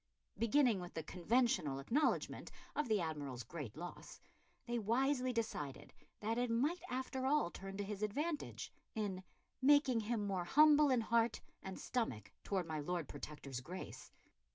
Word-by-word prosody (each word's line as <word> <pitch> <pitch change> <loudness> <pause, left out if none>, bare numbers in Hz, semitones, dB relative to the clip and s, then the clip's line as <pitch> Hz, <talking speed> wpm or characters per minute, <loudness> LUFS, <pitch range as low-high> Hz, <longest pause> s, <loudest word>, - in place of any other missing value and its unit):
Beginning 230 0 +4
with 175 -1 -8
the 160 - -2
conventional 180 - +1
acknowledgment 235 - 0 0.3
of 295 - 0
the 215 -2 +3
Admiral's 145 -7 -3
great 140 -1 -7
loss, 175 +2 -8 0.5
they 240 -1 -1
wisely 255 +4 +2
decided 215 - -3 0.3
that 225 +3 0
it 245 0 +1
might 280 +10 +1
after 260 +1 -2
all 280 -11 +3
turn 195 0 -7
to 205 - -1
his 200 0 -5
advantage, 295 +9 -2 0.2
in 200 -4 -2 0.4
"making 275 -3 +5
him 220 -1 -1
more 190 -3 -1
humble 300 - +7
in 255 -3 +4
heart 230 0 +2 0.2
and 190 0 -6
stomach 110 - -2
towards 185 -4 -1
my 155 -1 -2
Lord 170 +1 -2
Protector's 140 -4 -6
Grace." 180 +8 -8
215 Hz, 150 wpm, -38 LUFS, 175-255 Hz, 0.5 s, humble